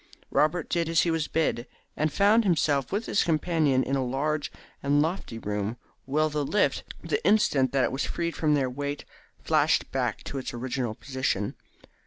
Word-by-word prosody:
Robert 155 Hz, +2 st, +2 dB
did 170 Hz, -2 st, 0 dB
as 165 Hz, -2 st, +4 dB
he 170 Hz, -, +1 dB
was 160 Hz, -2 st, 0 dB
bid, 145 Hz, -6 st, 0 dB, 0.3 s
and 155 Hz, 0 st, 0 dB
found 205 Hz, +8 st, +4 dB
himself 150 Hz, -, +1 dB
with 210 Hz, +3 st, -1 dB
his -, -, +2 dB
companion 155 Hz, -5 st, +2 dB
in 135 Hz, -, -1 dB
a 135 Hz, -, 0 dB
large 145 Hz, +4 st, -1 dB, 0.3 s
and 145 Hz, +1 st, +2 dB
lofty 160 Hz, -6 st, -1 dB
room, 105 Hz, +1 st, -3 dB, 0.3 s
while 155 Hz, +3 st, +1 dB
the 150 Hz, 0 st, -1 dB
lift, 205 Hz, +9 st, +1 dB, 0.2 s
the 430 Hz, +2 st, -1 dB
instant 140 Hz, -, +3 dB
that 135 Hz, -2 st, +2 dB
it -, -, +1 dB
was 135 Hz, -, -2 dB
freed 170 Hz, -1 st, -3 dB
from 150 Hz, -2 st, +2 dB
their 135 Hz, -3 st, +1 dB
weight, 140 Hz, +3 st, -4 dB, 0.4 s
flashed -, -, +2 dB
back -, -, -1 dB
to 140 Hz, -, -4 dB
its 130 Hz, -, -5 dB
original 120 Hz, -2 st, -3 dB
position. 130 Hz, -7 st, -2 dB
145 Hz, 180 wpm, -27 LUFS, 130-165 Hz, 0.4 s, as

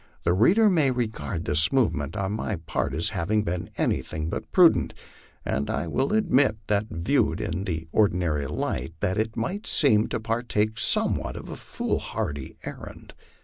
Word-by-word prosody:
The 85 Hz, -, +2 dB
reader 185 Hz, -, +5 dB
may 160 Hz, -8 st, +3 dB
regard 110 Hz, -7 st, -3 dB
this 75 Hz, +2 st, +4 dB
movement 80 Hz, -, 0 dB
on 95 Hz, 0 st, -1 dB
my 110 Hz, 0 st, -2 dB
part 80 Hz, -2 st, -3 dB
as 80 Hz, -, 0 dB
having 105 Hz, +5 st, 0 dB
been 90 Hz, -2 st, -3 dB
anything 80 Hz, +1 st, -1 dB
but -, -, -5 dB
prudent, 165 Hz, -, +4 dB, 0.5 s
and 70 Hz, +1 st, -1 dB
I -, -, -1 dB
will 130 Hz, -, 0 dB
admit 145 Hz, -, +3 dB
that 105 Hz, +1 st, 0 dB
viewed 85 Hz, 0 st, 0 dB
in 95 Hz, +4 st, -3 dB
the 80 Hz, -4 st, -3 dB
ordinary 85 Hz, -8 st, +1 dB
light 65 Hz, +6 st, -3 dB
it 110 Hz, +4 st, -1 dB
might 190 Hz, -, -3 dB
seem 110 Hz, -7 st, +3 dB
to -, -, -3 dB
partake 110 Hz, -1 st, -1 dB
somewhat -, -, +2 dB
of -, -, -9 dB
a -, -, -6 dB
foolhardy 70 Hz, -2 st, -4 dB
errand. -, -, -9 dB
105 Hz, 155 wpm, -25 LUFS, 85-120 Hz, 0.5 s, reader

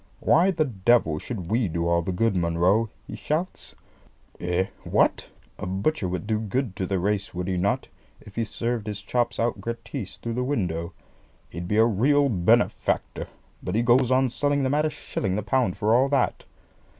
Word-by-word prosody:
"Why 165 Hz, +6 st, +4 dB
the 160 Hz, -4 st, +1 dB
devil 100 Hz, -, +2 dB
should 95 Hz, -6 st, -6 dB
we 115 Hz, -1 st, +2 dB
do 85 Hz, 0 st, -2 dB
all 85 Hz, 0 st, +3 dB
the 90 Hz, -, -3 dB
good, 105 Hz, +3 st, +1 dB
Munro?" 90 Hz, +6 st, +2 dB, 0.2 s
he -, -, -7 dB
shouts. 165 Hz, +5 st, -3 dB, 0.6 s
"Eh, 90 Hz, +1 st, 0 dB, 0.2 s
what? -, -, +1 dB, 0.3 s
A -, -, -4 dB
butcher 95 Hz, +5 st, -1 dB
would 90 Hz, 0 st, -3 dB
do 110 Hz, 0 st, 0 dB
good 110 Hz, 0 st, -2 dB
to 95 Hz, -, -2 dB
the 95 Hz, -, 0 dB
race, 100 Hz, +1 st, -1 dB
would 90 Hz, 0 st, -3 dB
he 95 Hz, -, 0 dB
not, 90 Hz, +3 st, 0 dB, 0.3 s
if 100 Hz, -, -15 dB
he 115 Hz, -, 0 dB
served 115 Hz, 0 st, -3 dB
his 105 Hz, -1 st, -4 dB
chops 120 Hz, -1 st, -1 dB
out 115 Hz, -3 st, 0 dB
gratis 115 Hz, -1 st, -5 dB
through 115 Hz, -, -4 dB
the 125 Hz, +2 st, -1 dB
window? 90 Hz, -, -2 dB, 0.6 s
He'd 85 Hz, +2 st, -6 dB
be 105 Hz, -, 0 dB
a 110 Hz, -, +6 dB
real 140 Hz, +6 st, +3 dB
benefactor; 90 Hz, -7 st, +1 dB, 0.3 s
but 90 Hz, -, -3 dB
he 115 Hz, -, +2 dB
goes 120 Hz, +1 st, +4 dB
on 130 Hz, 0 st, +3 dB
selling 145 Hz, +2 st, 0 dB
them 130 Hz, +1 st, +1 dB
at 150 Hz, +1 st, +2 dB
a -, -, +2 dB
shilling 110 Hz, -9 st, -3 dB
the 105 Hz, -, -2 dB
pound 115 Hz, -2 st, +1 dB
for 105 Hz, +2 st, +2 dB
all 130 Hz, +3 st, +4 dB
that. 135 Hz, -3 st, 0 dB
110 Hz, 190 wpm, -25 LUFS, 95-130 Hz, 0.6 s, a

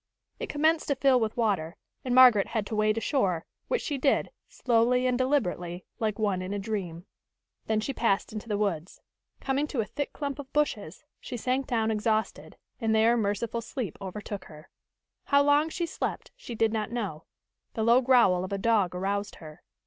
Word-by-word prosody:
It -, -, -5 dB
commenced 315 Hz, +2 st, +1 dB
to 280 Hz, -, +1 dB
fill 265 Hz, -1 st, +4 dB
with 220 Hz, 0 st, -2 dB
water, 195 Hz, -8 st, 0 dB, 0.3 s
and 250 Hz, -1 st, 0 dB
Margaret 245 Hz, -6 st, +7 dB
had 220 Hz, -3 st, -2 dB
to 220 Hz, -, -4 dB
wade 215 Hz, +1 st, +2 dB
ashore, 195 Hz, -, 0 dB, 0.2 s
which -, -, -1 dB
she 285 Hz, -3 st, -3 dB
did, 275 Hz, -, +1 dB, 0.2 s
slowly 245 Hz, +1 st, +2 dB
and 250 Hz, -1 st, +2 dB
deliberately, 185 Hz, -10 st, -1 dB
like 215 Hz, -2 st, -1 dB
one 200 Hz, -4 st, 0 dB
in 185 Hz, +2 st, -4 dB
a -, -, -1 dB
dream. 190 Hz, -5 st, -4 dB, 0.6 s
Then 220 Hz, -1 st, +1 dB
she 270 Hz, +5 st, -3 dB
passed 215 Hz, -4 st, 0 dB
into 220 Hz, +1 st, -7 dB
the 205 Hz, -, 0 dB
woods. 185 Hz, -5 st, -2 dB, 0.4 s
Coming 275 Hz, +2 st, 0 dB
to 275 Hz, -, -4 dB
a 220 Hz, -, +1 dB
thick 250 Hz, +7 st, -4 dB
clump 285 Hz, -1 st, -4 dB
of 270 Hz, -2 st, -9 dB
bushes, 225 Hz, -, -1 dB, 0.2 s
she 245 Hz, -, -6 dB
sank 255 Hz, +3 st, -1 dB
down 225 Hz, -3 st, +1 dB
exhausted, 220 Hz, 0 st, -1 dB, 0.2 s
and 225 Hz, -2 st, +1 dB
there 225 Hz, +2 st, +4 dB
merciful 225 Hz, +1 st, -1 dB
sleep 230 Hz, -, -5 dB
overtook 200 Hz, +1 st, -6 dB
her. 155 Hz, +1 st, -14 dB, 0.5 s
How 280 Hz, -1 st, +4 dB
long 290 Hz, +2 st, +3 dB
she 345 Hz, +1 st, -2 dB
slept, -, -, -4 dB
she -, -, -8 dB
did 225 Hz, 0 st, +1 dB
not 215 Hz, -2 st, -2 dB
know. 200 Hz, -10 st, -4 dB, 0.5 s
The 220 Hz, -, -1 dB
low 235 Hz, +3 st, +5 dB
growl 240 Hz, -9 st, +4 dB
of 185 Hz, -, -6 dB
a 200 Hz, -, -1 dB
dog 200 Hz, -4 st, +1 dB
aroused 200 Hz, +2 st, -2 dB
her. 155 Hz, 0 st, -12 dB
220 Hz, 185 wpm, -28 LUFS, 200-255 Hz, 0.6 s, Margaret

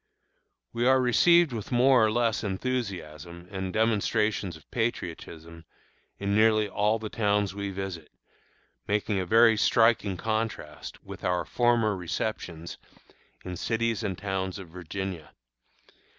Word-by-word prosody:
We 120 Hz, +1 st, +1 dB
are 130 Hz, 0 st, +5 dB
received 165 Hz, +5 st, +4 dB
with 110 Hz, 0 st, -6 dB
more 125 Hz, 0 st, +5 dB
or 110 Hz, -, +3 dB
less 115 Hz, -2 st, 0 dB
enthusiasm 95 Hz, -, -4 dB
and 95 Hz, -1 st, -4 dB
demonstrations 105 Hz, -3 st, 0 dB
of 75 Hz, -, -23 dB
patriotism 85 Hz, -7 st, -4 dB, 0.5 s
in 100 Hz, 0 st, -2 dB
nearly 110 Hz, 0 st, +4 dB
all 105 Hz, +2 st, +1 dB
the 110 Hz, -1 st, -6 dB
towns 105 Hz, -3 st, 0 dB
we 100 Hz, 0 st, -4 dB
visit, 95 Hz, -5 st, -6 dB, 0.8 s
making 105 Hz, 0 st, 0 dB
a 90 Hz, -, -3 dB
very 115 Hz, +2 st, +6 dB
striking 105 Hz, -2 st, +3 dB
contrast 110 Hz, -8 st, -4 dB
with -, -, -10 dB
our 90 Hz, 0 st, 0 dB
former 120 Hz, -4 st, +2 dB
receptions 90 Hz, -2 st, -4 dB, 0.7 s
in 90 Hz, -, -5 dB
cities 115 Hz, +1 st, -1 dB
and 100 Hz, -5 st, -3 dB
towns 95 Hz, -1 st, -3 dB
of 95 Hz, -4 st, -10 dB
Virginia. 90 Hz, 0 st, -6 dB
105 Hz, 125 wpm, -27 LUFS, 90-115 Hz, 0.8 s, very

